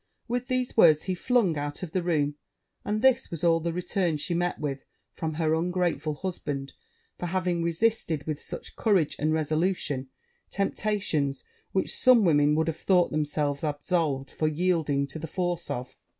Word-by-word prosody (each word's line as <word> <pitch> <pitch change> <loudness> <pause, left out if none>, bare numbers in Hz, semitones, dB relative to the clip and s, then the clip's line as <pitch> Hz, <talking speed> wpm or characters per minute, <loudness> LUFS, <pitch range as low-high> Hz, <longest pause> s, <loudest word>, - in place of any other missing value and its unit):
With 245 +1 -2
these 255 -1 -1
words 155 -8 +6
he 185 - -1
flung 190 - +1
out 145 +4 -4
of 170 - -5
the 185 - 0
room; 150 -4 +1 0.5
and 215 +2 -2
this 265 -1 +4
was 165 0 -6
all 165 -1 +4
the 170 +1 -2
return 175 -1 -1
she 160 +4 -3
met 175 +1 0
with 140 -2 -3 0.3
from 160 -2 -3
her 160 -1 +1
ungrateful 165 -3 0
husband, 145 -6 -4 0.5
for 175 - -2
having 180 -1 0
resisted, 170 -3 0
with 155 -1 -3
such - - -7
courage 195 -9 +2
and 155 +2 +1
resolution, 155 -3 0 0.4
temptations 195 -9 -1 0.3
which 190 - 0
some 245 -5 +5
women 150 -2 +4
would 160 +1 +2
have 165 -1 -2
thought 180 -2 +3
themselves 150 -1 -1
absolved 145 -2 -1
for 155 - 0
yielding 155 -3 +1
to 140 +3 -7
the 165 - -5
force 175 +1 -2
of. 125 +1 -4
165 Hz, 165 wpm, -27 LUFS, 150-185 Hz, 0.5 s, words